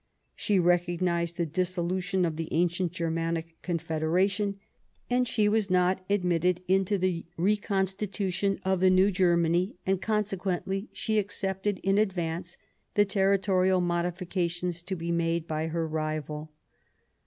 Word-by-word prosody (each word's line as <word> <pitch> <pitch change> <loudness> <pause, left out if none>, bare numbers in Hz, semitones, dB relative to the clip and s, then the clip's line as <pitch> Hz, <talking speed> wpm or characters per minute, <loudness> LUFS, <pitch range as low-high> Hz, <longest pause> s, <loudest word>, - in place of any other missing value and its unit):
She 205 - 0
recog 175 0 +2
nized 170 -2 0
the 170 - 0
dissolution 185 +2 0
of 165 -2 -2
the 165 0 -4
ancient 175 +1 +1
Germanic 165 -1 -3
Confederation; 180 +5 0 0.7
she 215 -3 +2
was 210 -1 +1
not 185 +1 +2
admitted 180 -2 +1
into 195 +2 +2
the 180 -3 -1
reconstitution 195 0 0
of 190 -1 +2
the 185 +1 +5
new 185 +2 +4
Germany, 175 0 +2
and 190 0 +1
conse 210 -2 0
quently 190 +2 -2
she 220 -1 0
accepted 195 0 -2
in 195 +1 +3
advance 175 -4 -2 0.4
the 205 - +5
territorial 190 -2 +2
modifications 175 0 -1
to 190 +2 -4
be 170 0 -3
made 170 -1 0
by 155 0 -2
her 165 0 -2
rival. 155 -1 -3
180 Hz, 130 wpm, -28 LUFS, 170-195 Hz, 0.7 s, the